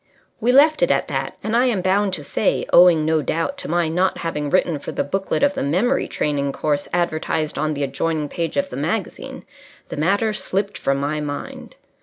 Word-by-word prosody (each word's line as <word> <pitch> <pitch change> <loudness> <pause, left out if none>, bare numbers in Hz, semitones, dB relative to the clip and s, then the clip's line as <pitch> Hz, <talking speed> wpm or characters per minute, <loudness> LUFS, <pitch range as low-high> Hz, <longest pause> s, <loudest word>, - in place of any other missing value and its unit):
We 240 +3 +2
left 300 +4 +5
it - - +3
at - - +1
that, - - -3
and 220 +1 -1
I 245 +2 +4
am 230 -7 +1
bound 195 +2 +2
to 155 -5 -3
say 195 - 0
owing, 170 -3 +6
no 160 0 +2
doubt, 165 - -2
to - - -6
my 170 0 +1
not 180 +4 +1
having 150 -3 -3
written 170 -2 +1
for - - -6
the - - -1
booklet 195 - -2
of 285 0 +4
the - - -3
Memory 190 - +1
Training 140 -2 -1
Course 145 -1 -1
advertised 155 -3 -1
on 155 0 0
the 145 - -2
adjoining 150 +3 -1
page 165 +2 -3
of 280 0 0
the - - -5
magazine - - -4 0.4
the - - -6
matter 200 +8 +1
slipped 200 -1 -2
from 135 0 0
my 145 +2 -2
mind. 145 -1 -6
165 Hz, 205 wpm, -21 LUFS, 150-200 Hz, 0.4 s, owing